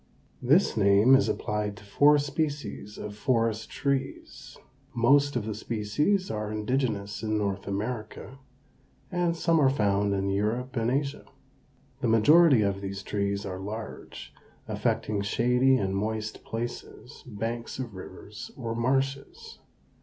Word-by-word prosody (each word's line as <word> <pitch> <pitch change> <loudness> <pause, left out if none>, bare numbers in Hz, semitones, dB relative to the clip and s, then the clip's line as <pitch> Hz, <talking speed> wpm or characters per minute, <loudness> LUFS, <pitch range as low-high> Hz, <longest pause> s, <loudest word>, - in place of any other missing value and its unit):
This 145 +10 +3
name 100 +4 +5
is 135 - +5
applied 105 -1 -2
to - - -13
four 145 +9 +5
species 145 -7 -3
of 105 -1 -7
forest 115 -1 0
trees. 135 -1 -4 0.4
Most 140 +4 +4
of 120 -4 -1
the 110 - -3
species 120 - -1
are 105 -1 -3
indigenous 110 -2 -2
in 110 -1 -1
North 100 -2 -2
America, 110 +5 -5 0.7
and 175 -2 0
some 165 -1 +2
are 135 - +5
found 100 -5 +1
in 100 0 -1
Europe 110 +6 -1
and 115 0 +1
Asia. 140 +2 -2 0.7
The 130 - -1
majority 130 +3 +6
of 100 -1 -1
these 100 0 -5
trees 100 0 -2
are 95 -1 -5
large, 110 +3 -7 0.3
affecting 105 -2 -1
shady 125 +5 +3
and 95 -3 -1
moist 110 +1 -3
places, 120 +3 -7
banks 115 +1 -4
of 125 -5 -5
rivers, 95 +2 -9
or 115 -3 -3
marshes. 135 +3 -2
115 Hz, 130 wpm, -27 LUFS, 105-135 Hz, 0.7 s, majority